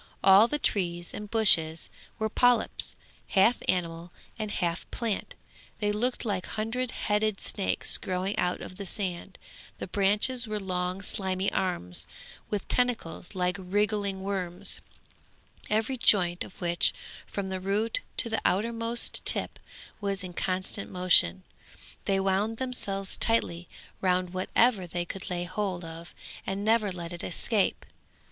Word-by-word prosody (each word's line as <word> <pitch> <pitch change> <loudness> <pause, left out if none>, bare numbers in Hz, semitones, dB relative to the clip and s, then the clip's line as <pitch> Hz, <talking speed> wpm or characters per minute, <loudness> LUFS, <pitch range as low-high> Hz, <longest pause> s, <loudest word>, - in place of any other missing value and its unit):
All 195 +3 +8
the 295 - -1
trees 175 -9 -1
and 210 0 -6
bushes 165 -8 +5 0.3
were 220 -1 0
polyps, 245 +2 +2 0.3
half 210 +5 +4
animal 170 -1 -1 0.3
and 215 -1 -2
half 170 -4 -2
plant; 230 -4 -3 0.4
they 205 -2 +1
looked 240 +5 -1
like 195 -4 -1
hundred 230 +4 -2
headed 210 -2 0
snakes 195 - -1
growing 185 +2 -2
out 180 0 0
of 185 - -9
the 200 - -6
sand, 185 -1 -4 0.4
the - - -4
branches 210 +6 +2
were 215 0 -2
long 185 0 -2
slimy 190 0 -1
arms, 90 - -2 0.4
with 205 -2 -2
tentacles 230 -7 -1
like 180 0 0
wriggling 200 0 0
worms, 185 -3 -2 0.9
every 220 +5 +1
joint 180 -6 +3
of - - -13
which, 175 -1 +2 0.3
from 195 -1 -4
the 190 0 -3
root 205 - 0 0.2
to - - +3
the 225 -1 -1
outermost 230 +3 +1
tip, - - +3 0.4
was 200 -2 -2
in 180 -1 -7
constant 185 +3 -2
motion. 175 - +3 0.6
They 195 -1 +2
wound 195 +4 +1
themselves 200 -7 -2
tightly 175 -7 0 0.3
round 180 -1 +1
whatever 190 +2 +2
they 175 +1 -2
could 195 +3 -6
lay 175 -1 -2
hold 185 -1 -3
of 165 +1 -9 0.3
and 195 +1 -2
never 220 -2 +3
let 175 -1 -6
it 175 - -5
escape. 205 +3 0
195 Hz, 140 wpm, -28 LUFS, 180-215 Hz, 0.9 s, All